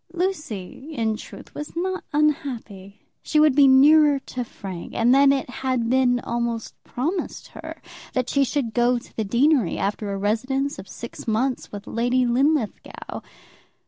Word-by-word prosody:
Lucy, 305 - -4
in 220 -2 0
truth, - - -11
was 295 +2 -7
not 370 +2 -2
unhappy. 255 -10 -2 0.2
She 305 - +1
would 305 -2 +5
be 285 -1 +7
nearer 290 +2 +6
to 255 -2 -5
Frank; 190 -6 -8
and 235 +2 +4
then 275 +1 +6
it 275 -1 0
had 250 -2 -1
been 255 -1 +3
almost 235 -1 -3
promised 325 +9 -3
her - - -9 0.3
that 255 -1 0
she 280 +1 +2
should 265 -4 -1
go 245 +1 +3
to 235 - -12
the 220 - -1
deanery, 240 - +2
after 205 +1 -2
a 195 - -2
residence 260 +8 -1
of 190 - -10
six 235 - -9
months 245 +4 -1
with 205 0 -8
Lady 245 +2 +1
Linlithgow. 260 0 -1
255 Hz, 155 wpm, -23 LUFS, 225-285 Hz, 0.3 s, be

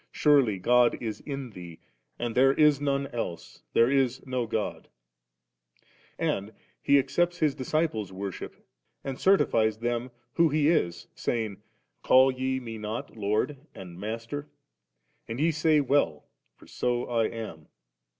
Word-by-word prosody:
Surely 140 -9 +3
God 120 +5 +3
is 110 -3 -4
in 135 -4 -5
thee^ 85 -3 -10 0.4
and 120 -1 -3
theie 135 +3 +4
is 150 -2 +5
none 140 -1 0
else^ 115 -10 -6
there 115 - +5
b 135 0 +3 0.2
no 130 -3 -2
God»/ 110 -1 -3 1.3
And 100 +3 -2 0.3
He 140 - +3
accepto 175 +6 0
His 150 -3 +2
discii)les' 130 - -1
worship, 95 0 -7 0.4
and 135 -1 -5
certifies 110 - +3
them 120 +2 -2 0.2
who 165 -1 +4
He 150 0 +2
is, 120 - 0
saying, 110 -4 -3 0.4
'Call 130 +1 +6
ye 130 0 -2
Me 115 -3 -7
not 110 +2 -5
Lord 105 +7 -1 0.2
and 90 -2 -10
Master? 115 +8 -5 0.8
and 115 +2 -5
ye 165 +3 +3
say 155 0 +3
well, 135 - +1 0.3
for - - -18
so 120 0 -1
I 115 -2 +1
am.' 110 -10 -8
125 Hz, 140 wpm, -27 LUFS, 110-140 Hz, 1.3 s, Call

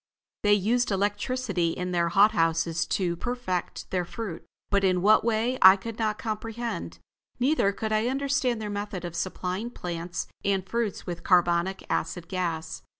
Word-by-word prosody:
They 205 0 +5
used 235 +5 +1
electricity 205 -2 0
in 180 0 -3
their 170 -1 +1
hot 205 +4 +5
houses 165 -2 +1
to 175 -3 0
perfect 240 -4 -3
their 180 -1 +1
fruit, 180 -1 -6 0.3
but 200 -1 +3
in 185 -2 +2
what 215 +2 +6
way 235 +3 0
I 190 +1 +10
could 225 +3 -7
not 215 -1 0
comprehend; 220 - -4 0.4
neither 255 -5 +3
could 215 +2 -4
I 215 +2 +2
understand 265 -3 0
their 210 -1 -4
method 205 -3 -4
of 170 -1 -6
supplying 185 +4 -3
plants 175 -5 -4 0.2
and 195 -1 0
fruits 230 -1 -2
with 175 -2 -5
carbonic 175 +1 +2
acid 165 +1 -2
gas. 170 -4 -3
195 Hz, 155 wpm, -27 LUFS, 175-225 Hz, 0.4 s, I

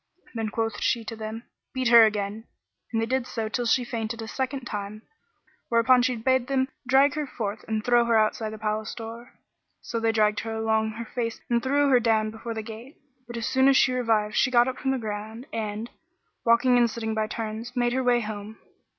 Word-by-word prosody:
Then 225 -2 -2
quoth 225 -1 -2
she 230 -2 0
to 225 - -5
them, 220 +1 -6 0.3
"Beat 255 -2 +1
her 230 -2 +9
again" 210 +1 -3 0.5
and 225 - 0
they 225 - +1
did 255 +1 -1
so 225 -3 -3
till 240 +2 -2
she 250 +2 +3
fainted 230 -1 -4
a - - -7
second 265 +3 -3
time, 210 0 -6 0.7
whereupon 240 +2 +5
she 250 0 +1
bade 255 +2 +1
them 265 -1 +1 0.2
drag 270 +2 +5
her 300 -1 -3
forth 215 -4 -4
and 220 -1 -2
throw 240 -1 +4
her 230 -1 +3
outside 215 0 +1
the 215 - -7
palace 215 0 -3
door. 230 +1 -9 0.5
So 230 - -4
they 225 0 +2
dragged 215 -1 +2
her 225 0 -4
along 220 0 +1
on 220 - -4
her 230 +2 -6
face 230 0 -4
and 235 0 +3
threw 280 +3 +2
her 255 -2 +5
down 220 -2 +1
before 225 +1 -6
the 220 - -4
gate; 230 +6 -10 0.3
but 240 0 -6
as 230 - -3
soon 265 0 +3
as 275 -1 +6
she 255 - +4
revived 225 -4 +1
she 255 - +3
got 240 -1 +4
up 260 0 -4
from 270 - -1
the 265 - +1
ground 220 +1 -6
and, 220 +1 -4 0.5
walking 245 +2 +4
and 240 -1 +4
sitting 220 -1 -3
by 220 0 0
turns, 225 +2 -5
made 240 -1 +1
her 260 +1 0
way 245 -1 +3
home. 215 0 -6
230 Hz, 220 wpm, -26 LUFS, 220-245 Hz, 0.7 s, her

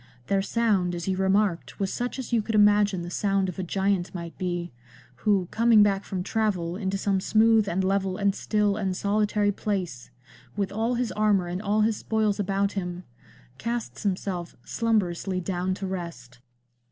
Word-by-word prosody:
Their 195 +5 +1
sound, 195 -4 +1
as 170 +1 -5
you 190 - +1
remarked, 190 -1 +1
was 195 -1 -1
such 245 +2 -3
as 255 -2 -5
you 230 - +4
could 220 +1 -3
imagine 205 -3 +4
the 175 - -6
sound 195 0 +1
of 180 - -7
a - - -1
giant 190 0 0
might 170 -1 -6
be, 175 -2 -3 0.5
who, 200 -4 +1
coming 230 -2 +5
back 200 -1 +1
from 185 -2 -3
travel 185 -6 -1
into 195 -1 -2
some 195 -1 +1
smooth 220 0 +4
and 190 +3 0
level 190 -1 0
and 200 -1 +2
still 210 0 0
and 190 -3 -1
solitary 205 0 +1
place, 185 - -3 0.5
with 200 -2 -1
all 225 +4 0
his 240 -1 -1
armour 210 -3 +2
and 175 +2 -4
all 210 +1 +1
his 215 0 +2
spoils 215 -2 0
about 200 0 0
him, 180 -2 -4 0.6
casts 235 0 -3
himself 185 -3 -2
slumberously 195 -5 0
down 185 0 -2
to 195 - -5
rest." 170 -10 -6
195 Hz, 175 wpm, -26 LUFS, 185-210 Hz, 0.6 s, coming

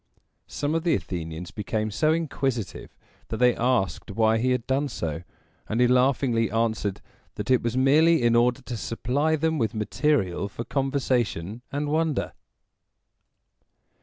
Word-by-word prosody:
Some 145 +1 -2
of 165 - +1
the 170 - +3
Athenians 85 -1 -5
became 110 +1 -2
so 155 +9 +2
inquisitive 135 - -2 0.3
that 110 - -4
they 125 0 +4
asked 120 -6 0
why 110 +2 +2
he 130 +3 +1
had 125 -2 0
done 135 +2 0
so, 80 - -4 0.5
and 110 - -1
he 125 - +5
laughingly 125 -3 +2
answered 110 -3 -1 0.3
that - - -3
it 130 - +4
was 120 +1 -2
merely 150 +3 +4
in 120 0 +4
order 125 +2 +2
to 125 -2 -5
supply 135 +8 0
them 160 0 0
with 115 -2 -1
material 105 - 0
for 115 - -6
conversation 125 - -1
and 145 +1 -2
wonder. 155 -1 0
125 Hz, 145 wpm, -25 LUFS, 110-140 Hz, 0.5 s, he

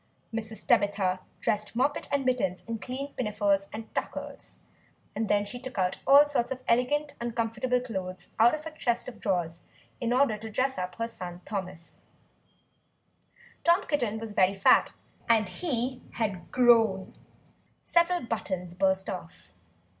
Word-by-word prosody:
Mrs. 220 -2 -4
Tabitha 205 -6 +2 0.2
dressed 210 +1 -1
Moppet 280 +4 0
and 280 -2 +1
Mittens 240 -8 0
in 230 -1 -3
clean 270 +6 -5
pinafores 205 -4 +1
and 220 +1 -8
tuckers; - - -4 0.6
and 220 0 -1
then 205 0 +3
she 245 +4 -6
took 260 -1 -8 0.3
all 285 +2 +8
sorts 245 -4 0
of 260 -1 -4
elegant 285 +5 +2
uncomfortable 235 +1 0
clothes 185 -7 -6
out 235 +5 +6
of 305 0 -9
a 320 -1 -7
chest 240 -4 0
of 255 - -8
drawers, 175 -4 -1 0.4
in 240 -1 -1
order 250 -4 +3
to 220 +1 -7
dress 260 +3 0
up 180 0 -4
her 230 0 -2
son 180 -6 -7
Thomas. 185 -4 -6 1.7
Tom 345 +4 +4
Kitten 240 -8 0
was 220 -1 -6
very 190 0 +3
fat, 195 - +5 0.4
and 220 -3 +4
he 255 - -2
had 200 -6 -3
grown; 225 -6 +4 0.7
several 345 +1 +2
buttons 185 -6 -3
burst 190 +1 +1
off. 180 - -8
225 Hz, 145 wpm, -28 LUFS, 195-255 Hz, 1.7 s, all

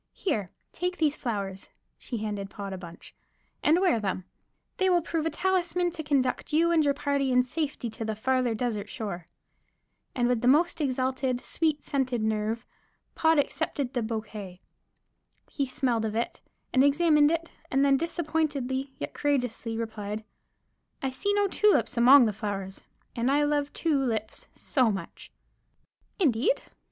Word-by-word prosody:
Here, 215 - -2 0.2
take 360 +1 -2
these 305 -2 +2
flowers" 200 -7 -4 0.3
(she 240 - -5
handed 205 -2 -4
Pod 200 -1 -6
a - - -5
bunch) 170 -1 -11 0.5
"and 320 +4 +4
wear 365 -12 +3
them. 190 -3 -2 0.5
They 375 0 +3
will 350 -2 +3
prove 325 -1 -1
a - - +1
talisman 360 -1 0
to 320 - -5
conduct 280 -4 0
you 330 +3 +3
and 325 -2 +4
your 285 -1 +2
party 280 -2 0
in 250 0 +5
safety 295 -1 -3
to 225 - -5
the 220 -1 -2
farther 255 +1 +1
desert 220 -3 -2
shore." 180 -6 -5 0.9
And 245 -1 +2
with 245 -2 +1
the 245 - +1
most 320 +5 +3
exalted, 260 -2 0
sweet 310 +1 -1
scented 255 -5 -1
nerve 220 +2 -1 0.5
Pod 320 0 +3
accepted 285 -2 -1
the 245 - 0
bokay. 215 -4 -5 0.9
He 280 -2 -1
smelled 245 -4 0
of 215 0 -3
it, 235 - -2 0.3
and 260 - +5
examined 295 +1 +5
it, 330 +1 -2 0.2
and 270 +1 +3
then 275 -1 +5
disappointedly 285 -4 -1
yet - - -5
courageously 245 -5 -1
replied: 220 -1 -4 0.8
"I 265 - 0
see 400 +10 -1
no 410 0 +3
tulips 420 +2 +2
among 250 +2 +8
the 215 - 0
flowers, 195 -2 -5 0.3
and 235 +2 +1
I 290 +2 +3
love 290 -1 0
two 315 -4 +1
lips 220 -5 -2
so 255 -4 +2
much." 190 -4 -7 0.9
"Indeed? 290 - +2
260 Hz, 155 wpm, -28 LUFS, 220-300 Hz, 0.9 s, among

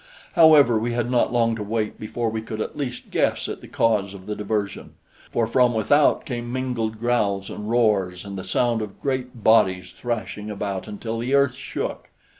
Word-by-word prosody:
However, 150 -8 +6
we 120 +2 -2
had 120 0 -1
not 125 - +2
long 115 -1 +2
to 110 - -6
wait 105 +1 -2
before 115 +1 -2
we 110 0 -3
could 110 -1 -6
at - - -4
least 125 -4 -5
guess - - +1
at - - -6
the - - -11
cause 100 -4 +1
of 95 -1 -11
the 105 0 -3
diversion, 105 -1 -3 0.4
for 115 - +1
from 120 +1 +3
without 145 +7 +3
came 120 -2 -4
mingled 120 -4 -2
growls 105 -5 0
and 105 +1 -6
roars 100 -6 +1
and 100 -1 -6
the 95 - -5
sound 115 +4 +1
of 105 -2 -7
great 130 -4 -3
bodies 95 -5 +4
thrashing 110 -1 -4
about 100 -2 -4
until 110 +2 -5
the 125 +4 0
earth 140 -2 +4
shook. - - -5
115 Hz, 190 wpm, -23 LUFS, 105-120 Hz, 0.4 s, However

